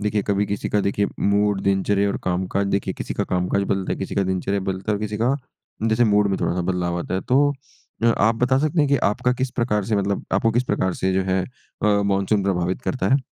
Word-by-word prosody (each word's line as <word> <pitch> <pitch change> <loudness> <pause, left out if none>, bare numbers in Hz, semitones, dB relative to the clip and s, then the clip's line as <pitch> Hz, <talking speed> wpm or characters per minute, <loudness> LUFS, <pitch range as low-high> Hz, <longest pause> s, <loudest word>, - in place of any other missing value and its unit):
देखिए 105 0 0
कभी 100 0 0
किसी 100 - -3
का 105 - +2
देखिए 100 +1 0
मूड, 100 0 +2
दिनचर्या 100 +1 +2
और - - -1
काम-काज 95 +2 0
देखिए 100 0 -1
किसी - - -5
का - - -1
काम-काज 90 +2 0
बदलता 95 -1 -1
है, - - -4
किसी 95 - -4
का 100 - +2
दिनचर्या 95 +1 -1
बदलता 95 +2 -2
है - - +2
और 100 - -7
किसी 105 0 -3
का 125 +4 +2 0.5
जैसे 115 +2 +3
मूड 105 -1 +3
में 95 - 0
थोड़ा-सा 90 - 0
बदलाव 90 -1 -1
आता 90 - -4
है। 95 - 0
तो 145 +3 +3 0.5
अ, - - +4
आप 115 -1 +3
बता 130 +1 +3
सकते 155 +4 0
हैं 145 - +2
कि 140 - +4 0.2
आपका 125 +4 0
किस 130 0 -2
प्रकार 105 -5 0
से 110 0 0
मतलब 100 0 -1
आपको 115 +4 +3
किस 120 - +2
प्रकार 95 -6 0
से 95 - 0
जो 95 +1 +1
है 95 - +2 0.4
अ, 105 -1 +3
मानसून 100 +1 +1
प्रभावित 95 +2 -1
करता 130 - -1
है? - - +4
100 Hz, 240 wpm, -22 LUFS, 95-110 Hz, 0.5 s, अ